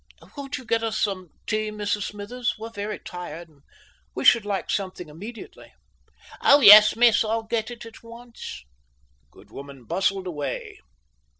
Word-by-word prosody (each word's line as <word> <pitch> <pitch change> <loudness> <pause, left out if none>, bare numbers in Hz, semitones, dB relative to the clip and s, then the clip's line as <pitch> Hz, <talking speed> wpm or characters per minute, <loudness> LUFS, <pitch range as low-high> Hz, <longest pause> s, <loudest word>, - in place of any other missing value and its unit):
"Won't 280 -1 -6
you 255 - -11
get 230 0 0
us 225 -1 -2
some 185 -4 -2 0.2
tea, 215 0 -1
Mrs 210 -1 -3
Smithers? 210 +4 -4
We're 225 +1 -8
very 205 -1 -5
tired, 175 -2 -9
and 145 -3 -26 0.5
we - - -4
should 230 -4 +5
like 200 -2 -3
something 185 -4 -4
immediately." 210 +10 -11 0.7
"Yes, 215 -6 +8
miss. 230 -2 +4
I'll 225 +1 -2
get 220 0 -3
it 240 -1 -9
at 230 - -13
once." 230 - -11 0.6
The - - -40
good - - -20
woman 140 -2 -11
bustled 190 +4 -1
away. 150 -5 -5
210 Hz, 155 wpm, -24 LUFS, 185-230 Hz, 0.7 s, Yes